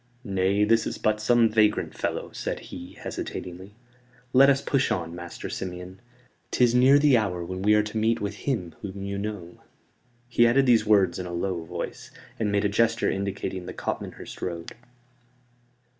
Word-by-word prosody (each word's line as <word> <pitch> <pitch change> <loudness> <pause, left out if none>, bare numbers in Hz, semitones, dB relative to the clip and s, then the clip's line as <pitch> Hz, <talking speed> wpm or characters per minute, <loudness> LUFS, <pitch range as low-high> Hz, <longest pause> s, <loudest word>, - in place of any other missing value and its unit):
"Nay, 100 -1 +1
this 115 +1 +3
is - - -4
but 105 0 0
some 120 +1 +4
vagrant 110 -1 +2
fellow," - - -3
said - - -4
he, - - -10
hesitatingly. 90 +3 -7 0.6
"Let 135 +2 +7
us 140 -1 +4
push 135 -1 0
on, 85 -2 -2
Master 85 0 -7
Simeon; 90 0 -6 0.5
'tis 120 -2 +3
near 130 +3 +6
the 145 -2 +5
hour 90 -6 -1
when 95 +2 -5
we 105 +2 +4
are 105 - +4
to 105 +1 -5
meet 115 +1 +2
with 100 0 -3 0.2
him 90 - -2
whom 100 -1 -6
you 100 0 -3
know." 100 -4 -6 0.7
He 120 -1 +4
added 135 +3 +4
these 115 -4 +4
words 95 -5 +4
in 90 - -4
a - - -6
low 85 0 -2
voice, 80 - -6 0.3
and 105 -2 0
made 100 0 +1
a - - +5
gesture 115 +3 +2
indicating 95 -2 -4
the - - -7
Copmanhurst - - -5
road. 85 -2 -4
105 Hz, 175 wpm, -26 LUFS, 95-115 Hz, 0.7 s, Let